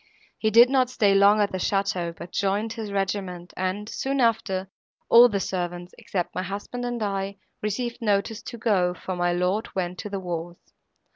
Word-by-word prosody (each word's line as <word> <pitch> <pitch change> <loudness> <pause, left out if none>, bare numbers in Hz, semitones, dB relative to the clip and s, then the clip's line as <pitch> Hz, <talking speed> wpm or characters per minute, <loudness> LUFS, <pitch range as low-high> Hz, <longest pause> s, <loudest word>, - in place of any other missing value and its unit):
He 220 - +2
did 230 +3 +8
not 260 -1 +2
stay 205 -5 +3
long 200 +2 +6
at 205 - +1
the 185 - -3
château, 185 -3 -1
but 175 - -9
joined 205 +3 0
his 220 -3 -6
regiment, 190 -3 -3
and, 185 +3 -2
soon 270 +4 -2
after, 220 -5 +1 0.4
all 240 +1 +9
the 200 -3 -1
servants, 175 -1 -4
except 180 -3 -3
my - - -2
husband 205 +6 -5
and 240 -2 -2
I, 195 -1 -2 0.2
received 235 +4 -3
notice 210 +1 0
to 235 - -8
go, 190 -6 +1
for 185 - -5
my 175 0 +1
lord 180 +5 -1
went 180 -1 -2
to 210 - -5
the 200 -1 -3
wars. 175 -1 -5
200 Hz, 185 wpm, -25 LUFS, 185-220 Hz, 0.4 s, all